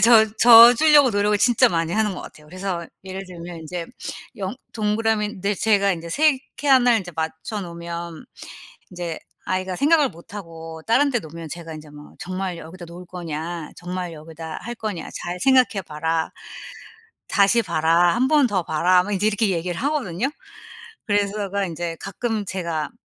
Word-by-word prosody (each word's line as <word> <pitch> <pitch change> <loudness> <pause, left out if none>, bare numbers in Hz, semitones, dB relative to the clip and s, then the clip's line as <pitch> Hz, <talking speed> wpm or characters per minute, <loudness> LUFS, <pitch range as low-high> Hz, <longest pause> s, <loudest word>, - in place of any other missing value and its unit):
져 225 +1 +7
져 235 +1 +10
주려고 295 -1 +6
노력을 205 0 +1
진짜 235 +2 +5
많이 165 -1 -1
하는 210 -3 +1
것 - - -7
같아요. 150 0 -12
그래서 185 0 -4 0.2
예를 190 +1 -6
들면 175 -1 -9
인제 170 +1 -6 0.5
영 195 +2 -4 0.2
동그라미인데 210 -2 0
제가 200 -2 +2
인제 170 -1 -6
3 300 - +3 0.2
칸을 255 -5 +4
이제 175 -2 -9
맞춰 160 +6 -4
놓으면 170 -2 -7 0.7
이제 175 -3 -5 0.3
아이가 185 0 -2
생각을 295 - +4
못하고 165 -3 -10
다른 280 +5 +4
데 240 - +1
놓으면 160 -2 -9
제가 165 -1 -7
인제 155 -1 -10
뭐 150 0 -13
"정말 185 -1 -4
여기다 175 +2 -10
놓을 175 +2 -11
거냐. 170 -2 -6
정말 180 -1 -5
여기다 160 0 -8
할 240 - -5
거냐. 215 -6 -5
잘 175 +1 -4
생각해 255 -5 +3
봐라. 160 +1 -2 1.0
다시 205 +3 +4
봐라. 170 0 +3
1 255 +2 +2
번 295 -3 +4
더 195 -5 0
봐라." 180 +3 +3
뭐 205 - -6
인제 200 +2 +1
이렇게 215 0 +2
얘기를 175 -1 -2
하거든요. 265 - -1 0.8
그래서 205 -1 +1 0.2
제가 200 +1 -1
인제 170 -1 -4
가끔 220 +1 -3
제가 170 -6 -3
185 Hz, 325 characters per minute, -22 LUFS, 170-215 Hz, 1.0 s, 져